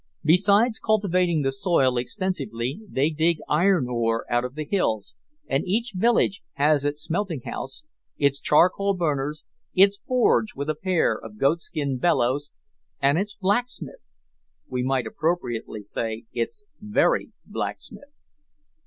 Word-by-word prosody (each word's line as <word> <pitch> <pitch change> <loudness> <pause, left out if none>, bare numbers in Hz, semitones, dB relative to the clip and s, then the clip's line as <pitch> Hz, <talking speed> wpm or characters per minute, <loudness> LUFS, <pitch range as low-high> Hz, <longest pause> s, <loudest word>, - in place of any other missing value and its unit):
Besides 200 +8 +4
cultivating 185 -7 +1
the 135 - +1
soil 135 -3 +2
extensively, 130 - -2
they 145 +4 +1
dig 160 +2 +2
iron 170 -3 +3
ore 115 -2 0
out 120 0 +2
of 125 +1 -5
the 155 0 -4
hills, 110 - -1 0.3
and 135 - 0
each 225 +4 0
village 205 0 +2
has 145 0 +3
its 145 +1 -2
smelting 170 -5 -2
house, 135 - -6 0.3
its 140 -2 +2
charcoal 190 +5 +3
burners, 150 -3 -1 0.3
its 200 +1 +5
forge 245 -3 +2
with 140 +3 -2
a - - -5
pair 185 -10 +2
of 110 -1 -10
goatskin 140 -1 0
bellows, 145 -2 +1 0.5
and 140 +4 +3
its 205 +1 -3
blacksmith 240 - -2 0.7
we 125 -1 -2
might 130 0 0
appropriately 120 -10 -2
say, 110 +2 -4
its 425 -2 -3 0.2
very 210 +1 +1
blacksmith! 285 - -6
155 Hz, 130 wpm, -24 LUFS, 135-195 Hz, 0.7 s, its